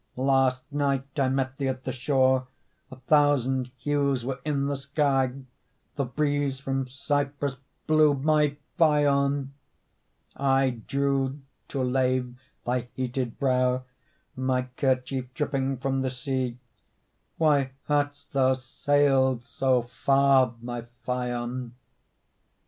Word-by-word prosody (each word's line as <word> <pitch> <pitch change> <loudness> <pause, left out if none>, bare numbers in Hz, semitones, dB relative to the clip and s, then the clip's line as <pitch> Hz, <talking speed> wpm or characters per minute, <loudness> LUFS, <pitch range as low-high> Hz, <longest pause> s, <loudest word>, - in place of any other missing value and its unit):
Last 130 -1 +2
night 140 0 -1
I 135 -1 +3
met 130 0 -1
thee 140 - -1
at 130 0 -3
the - - -3
shore, 130 0 +2 0.4
A 130 - -9
thousand 130 -1 +2
hues 140 -4 0
were 135 0 -3
in 145 -2 0
the 140 0 -1
sky; 140 -2 +1 0.6
The 140 - 0
breeze 145 +1 -1
from 135 -1 -2
Cyprus 140 +1 -2 0.3
blew, 155 -2 +4
my 150 +1 +2 0.2
Phaon! 140 -3 +3 0.8
I 135 -1 +2 0.2
drew, 140 0 0 0.3
to 135 - -2
lave 125 -1 0 0.3
thy 125 0 -1
heated 125 -2 -3
brow, 130 -1 +1 0.5
My 130 -1 0
kerchief 130 -1 -1
dripping 135 -2 -1
from 135 +1 -1
the 130 - 0
sea; 130 -1 -3 0.8
Why 145 -4 +2
hadst 145 -1 -1
thou 130 -1 +4
sailed 135 -1 +2
so 130 -2 +1
far, 130 +1 +3
my 120 -1 -5 0.2
Phaon? 125 -1 -3
135 Hz, 115 wpm, -26 LUFS, 130-140 Hz, 0.8 s, blew